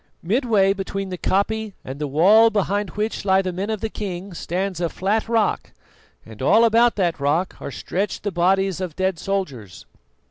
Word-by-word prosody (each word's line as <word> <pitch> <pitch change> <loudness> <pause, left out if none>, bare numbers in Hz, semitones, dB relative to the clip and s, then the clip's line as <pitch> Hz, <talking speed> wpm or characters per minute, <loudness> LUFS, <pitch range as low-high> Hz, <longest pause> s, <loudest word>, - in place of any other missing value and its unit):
Midway 205 -1 +2
between 195 0 -4
the 180 - -5
koppie 215 +2 0
and 135 +2 -7
the 150 - -2
wall 200 +11 +5
behind 205 -1 -1
which 210 +5 -3
lie 190 -1 +3
the 185 -1 -3
men 195 +4 -3
of 220 -2 -3
the 220 - -2
king 190 -2 -6
stands 180 +1 -3
a 170 - 0
flat 210 +6 -1
rock, 225 -3 0 0.5
and 110 0 -12
all 225 - +5
about 230 +1 +4
that 175 -6 0
rock 150 +6 0
are - - -5
stretched 190 +8 -3
the 205 - -2
bodies 190 +1 +1
of 175 -4 -4
dead 190 -2 -1
soldiers. 140 - -4
195 Hz, 180 wpm, -22 LUFS, 175-210 Hz, 0.5 s, wall